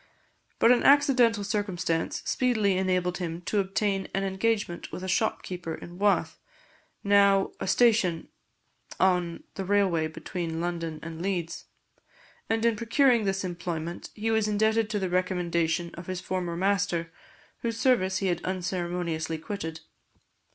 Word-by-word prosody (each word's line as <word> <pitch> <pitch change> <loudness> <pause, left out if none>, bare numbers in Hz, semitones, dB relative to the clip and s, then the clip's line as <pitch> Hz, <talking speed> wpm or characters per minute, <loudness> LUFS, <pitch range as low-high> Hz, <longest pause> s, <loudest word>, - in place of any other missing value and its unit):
But 230 - +5
an 250 - +4
accidental 255 -7 +4
circumstance 185 -5 -1
speedily 220 -6 +2
enabled 185 -1 0
him 170 -1 -4
to 205 +4 0
obtain 195 0 0
an 195 - 0
engagement 195 -1 -1
with 185 - -6
a - - -4
shopkeeper 180 -5 -1
in 175 +1 -11
Wath, 205 0 +1 0.6
now 200 -1 +4
a - - -3
station 210 -8 +3 0.7
on 180 -3 +1
the 195 - -4
railway 190 -5 +2
between 165 +1 -5
London 165 -2 -3
and 165 0 -7
Leeds; 175 -3 -3 0.8
and 225 +1 +1
in 230 -1 +3
procuring 235 +1 +3
this 195 0 0
employment, 170 -2 -4
he 225 +1 -1
was 220 -1 +2
indebted 220 +1 +2
to 215 - -1
the 190 -2 -1
recommendation 175 -2 0
of 170 0 -9
his 185 -1 -3
former 180 -2 -3
master, 190 -3 0 0.5
whose 230 -1 -3
service 190 -8 +2
he 195 - -2
had 180 -2 0
unceremoniously 175 -3 -2
quitted. 160 -2 -6
185 Hz, 135 wpm, -27 LUFS, 175-210 Hz, 0.8 s, But